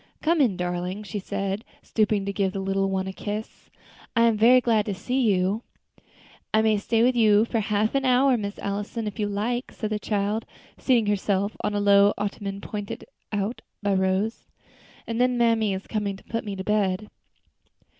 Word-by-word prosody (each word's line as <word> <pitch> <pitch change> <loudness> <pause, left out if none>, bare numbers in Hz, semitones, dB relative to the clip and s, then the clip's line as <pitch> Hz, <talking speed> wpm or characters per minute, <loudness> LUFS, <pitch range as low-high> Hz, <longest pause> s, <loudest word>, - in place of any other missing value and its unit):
"Come 325 0 +3
in, 220 -9 +2
darling," 180 +3 -3
she 205 0 -5
said, 195 +2 -3 0.2
stooping 210 -2 +1
to 200 - -2
give 195 -2 0
the 195 - -3
little 195 0 0
one 190 0 -1
a 190 - -5
kiss; 210 +2 -6 0.5
"I 230 - +4
am 230 -1 +4
very 235 +4 +6
glad 225 -4 +1
to 200 - -2
see 255 +7 -1
you." 200 -1 +2 0.9
"I 220 0 +3
may 220 -1 +3
stay 225 +2 +1
with 250 +1 +3
you 215 -2 +5
for 230 - -1
half 210 0 0
an 275 0 +1
hour, 260 +1 +4
Miss 205 -3 -4
Allison, 205 +3 -3
if 210 -1 -5
you 210 - +1
like," 230 +5 -2
said 215 -1 -4
the 210 - -1
child, 210 +1 -1 0.3
seating 240 -4 +3
herself 200 0 0
on 210 - 0
the 205 - 0
low 200 0 +5
ottoman 200 -1 -4
pointed 205 -1 -6 0.3
out 205 +3 -2 0.2
by 200 -1 +2
Rose, 190 +4 0 0.6
"and 230 +1 -2
then 250 0 +2
mammy 230 -3 +3
is 190 0 -4
coming 210 -3 -2
to - - -18
put 230 -1 -4
me 200 -2 -4
to 190 - -5
bed." 210 -1 0
210 Hz, 190 wpm, -25 LUFS, 200-225 Hz, 0.9 s, very